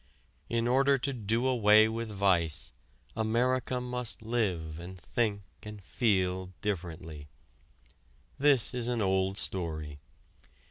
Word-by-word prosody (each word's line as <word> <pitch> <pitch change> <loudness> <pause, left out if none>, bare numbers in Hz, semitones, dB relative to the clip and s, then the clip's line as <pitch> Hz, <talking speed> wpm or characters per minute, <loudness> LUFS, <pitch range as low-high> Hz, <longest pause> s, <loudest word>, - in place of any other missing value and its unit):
In 115 0 0
order 135 +2 +4
to 140 +2 -3
do 115 +1 -1
away 110 -4 +5
with 115 0 -4
vice 90 -6 +1 0.4
America 125 +3 0
must 125 -2 -5
live 90 -9 -1
and 90 +2 -9
think 105 +1 -1 0.2
and 105 0 -9
feel 95 -4 0
differently. 80 -6 -5 1.1
This 140 -4 +4
is 120 -1 -1
an 120 -3 0
old 95 0 +1
story. 80 -7 -3
105 Hz, 110 wpm, -30 LUFS, 90-120 Hz, 1.1 s, away